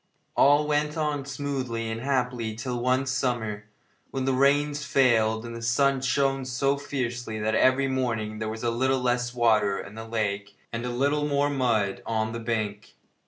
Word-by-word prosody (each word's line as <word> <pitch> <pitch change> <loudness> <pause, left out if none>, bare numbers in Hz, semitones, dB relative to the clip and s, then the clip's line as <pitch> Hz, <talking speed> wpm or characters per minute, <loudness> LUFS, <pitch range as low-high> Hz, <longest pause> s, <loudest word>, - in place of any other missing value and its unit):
All 145 +2 +5
went 150 +1 0
on 150 -3 -1
smoothly 135 -5 -3
and 110 +1 -4
happily 125 -4 -1
till 120 +2 -3
one 130 +2 +2
summer, 120 -5 -1 0.4
when 130 -1 -3
the 135 - +2
rains 145 +2 +2
failed 115 -5 +2
and 115 0 -6
the 115 - -7
sun 135 +3 +2
shone 135 +1 +1
so 130 +2 0
fiercely 120 -5 -4
that 110 +1 0
every 130 +4 +4
morning 115 -5 -2
there 110 -1 -2
was 110 +1 -6
a 120 - +1
little 130 +3 +1
less 125 -1 0
water 110 -4 +3
in 100 - -8
the 110 +1 -8
lake 100 -3 -2 0.2
and 120 +2 -3
a - - -2
little 140 +4 +1
more 145 0 +1
mud 115 -8 0
on 110 -1 0
the 115 - -4
bank. 110 -2 -3
125 Hz, 175 wpm, -26 LUFS, 110-135 Hz, 0.4 s, All